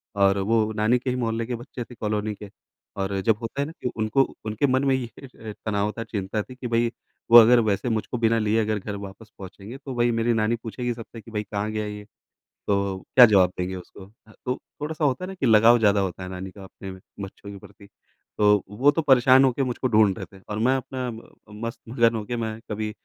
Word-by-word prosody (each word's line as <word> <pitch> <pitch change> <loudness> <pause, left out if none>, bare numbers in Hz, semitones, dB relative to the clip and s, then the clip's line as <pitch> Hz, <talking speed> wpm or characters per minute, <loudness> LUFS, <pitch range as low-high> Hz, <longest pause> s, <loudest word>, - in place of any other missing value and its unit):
और 100 0 +3
वो 110 +2 +1
नानी 110 +3 +3
के 130 - -3
ही 125 - -1
मोहल्ले 115 -2 -1
के 120 0 -3
बच्चे 120 +1 -7
थे 120 +1 -14
कॉलोनी 105 -1 -2
के 100 0 -11 0.5
और 95 0 -1
जब 110 +1 +2
होता 125 +5 -4
है - - 0
ना 155 - -7
कि 125 - -1
उनको 110 +5 +1 0.2
उनके 110 +6 0
मन 130 +1 +1
में 135 -1 +3
ही 130 - -2 0.3
ये 110 -2 -9
तनाव 105 0 0
था, 115 - -3
चिंता 105 0 -3
थी 125 +6 -12
कि 125 -1 -6
भई 115 0 +1 0.4
वो 120 - +11
अगर 120 +1 +8
वैसे 110 +2 0
मुझको 110 +2 -2
बिना 115 0 +2
लिए 110 +1 +1
अगर 105 -1 -1
घर 100 +1 -6
वापस 100 +2 -10
पहुँचेंगे 100 +6 -10
तो 135 -2 -8
भई 120 0 +2
मेरी 115 +1 +1
नानी 110 +1 +1
पूछेगी 120 +2 -3
सबसे 115 -1 -10
कि 115 - -14
भाई 105 -1 -2
कहाँ 105 +1 -3
गया 110 -1 -2
ये? 105 0 -7 0.6
तो 100 -2 0 0.2
क्या 125 -2 +11
जवाब 95 -4 +4
देंगे 90 +1 -3
उसको? 95 +1 -11 0.2
ह - - -16
तो 125 0 0 0.3
थोड़ा-सा 155 0 -2
होता 135 +5 0
है - - -4
ना 190 - -6
कि 140 - -2
लगाव 115 +1 +6
ज़्यादा 100 -2 +3
होता 95 -1 -4
है 90 - -6
नानी 95 0 -7
का 100 -1 -12
अपने 95 0 -10 0.3
बच्चों 100 +1 -9
के 100 - -9
प्रति। 100 0 -16 0.5
तो 105 -1 +4
वो 145 +3 +5
तो 165 - -1
परेशान 130 -2 +6
होके 135 +1 +2
मुझको 130 +1 -2
ढूँढ़ 110 -3 +4
रहे - - -6
थे - - -18
और 105 +1 -3
मैं 130 - +3
अपना 130 -1 -4
म 110 0 -9 0.4
मस्त-मगन 115 0 0
हो 110 - -3
के 120 - -3
मैं 110 -1 -4
कभी 105 0 -3
110 Hz, 235 wpm, -24 LUFS, 105-120 Hz, 0.6 s, वो